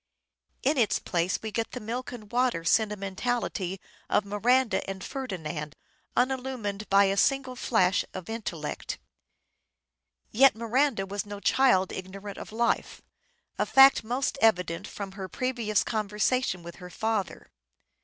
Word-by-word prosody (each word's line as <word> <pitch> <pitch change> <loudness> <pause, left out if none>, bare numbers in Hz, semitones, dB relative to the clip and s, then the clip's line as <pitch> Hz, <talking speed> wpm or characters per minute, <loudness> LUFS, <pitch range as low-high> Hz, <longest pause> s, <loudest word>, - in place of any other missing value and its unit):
In 280 +1 +2
its 210 -6 +3
place 175 +1 -1
we 220 - -4
get 225 +1 -3
the 250 - -4
milk 240 +3 -4
and 215 -4 -10
water 245 -8 +1
sentimentality 200 0 0 0.3
of 205 - +2
Miranda 230 +4 +2
and 190 -1 -5
Ferdinand 160 - -5 0.4
unillumined 250 -5 -1
by 200 0 +6
a 195 0 +2
single 265 +4 +1
flash 200 -6 +2
of 185 -2 -7
intellect. 225 -1 -4 1.3
Yet 265 +3 +6
Miranda 235 -1 +1
was 200 0 -3
no 205 0 -6
child 200 -5 +3
ignorant 195 +2 -7
of - - -9
life: 235 +2 -1 0.6
a - - +2
fact 270 -2 +7
most 255 +4 -1
evident 180 -6 +2
from 200 -2 -6
her 190 -1 -7
previous 235 -2 0
conversation 215 -1 0
with 170 0 -9
her 180 -1 -10
father. 220 +1 -3
215 Hz, 135 wpm, -28 LUFS, 195-250 Hz, 1.3 s, fact